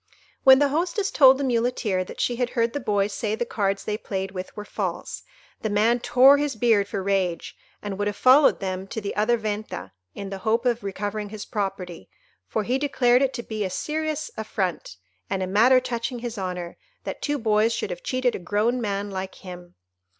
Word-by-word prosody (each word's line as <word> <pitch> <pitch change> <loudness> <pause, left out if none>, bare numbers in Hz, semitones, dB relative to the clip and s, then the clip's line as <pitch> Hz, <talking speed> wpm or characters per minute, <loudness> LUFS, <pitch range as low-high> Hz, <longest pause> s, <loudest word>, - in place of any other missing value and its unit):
When 265 0 +9
the 285 0 +3
hostess 355 +7 -1
told 265 -2 +7
the 280 - -2
Muleteer 230 -6 0
that - - -10
she 240 - 0
had 245 -1 0
heard 230 0 +2
the 285 - -2
boys 205 -4 0
say 215 -1 -2
the 240 - -2
cards 195 -3 -1
they 210 0 -3
played 190 -3 -4
with 185 +1 -7
were 210 - -6
false, - - -4 0.4
the 220 - -1
man 220 +4 +2
tore 265 +4 +6
his 290 -3 -1
beard 220 -3 +3
for 195 -1 -4
rage, 190 -3 -1 0.3
and 205 -1 -5
would 205 - 0
have 205 - -2
followed 265 +6 +5
them 190 -1 -4
to 220 - -4
the 200 -2 -5
other 220 +3 +2
Venta, 215 -1 -5 0.2
in 200 -1 -6
the 195 - -5
hope 225 +5 0
of 240 -3 +1
recovering 205 +1 -4
his 215 0 -7
property; 195 -5 -4 0.4
for 220 - -1
he 250 +5 0
declared 255 -3 +3
it 270 -1 +2
to 235 - -4
be 215 -2 -4
a 190 - -2
serious 310 +8 -3
affront, 190 - -3 0.3
and 190 - -1
a - - 0
matter 230 +7 +5
touching 245 0 -3
his 240 -1 -5
honour, 180 -3 -5 0.3
that - - -6
two 290 0 -1
boys 220 -2 +2
should 230 - -3
have - - -6
cheated 255 - 0
a - - -4
grown 215 +7 0
man 200 -1 -2
like 190 0 -5
him. 180 -1 -10
215 Hz, 205 wpm, -24 LUFS, 195-250 Hz, 0.4 s, When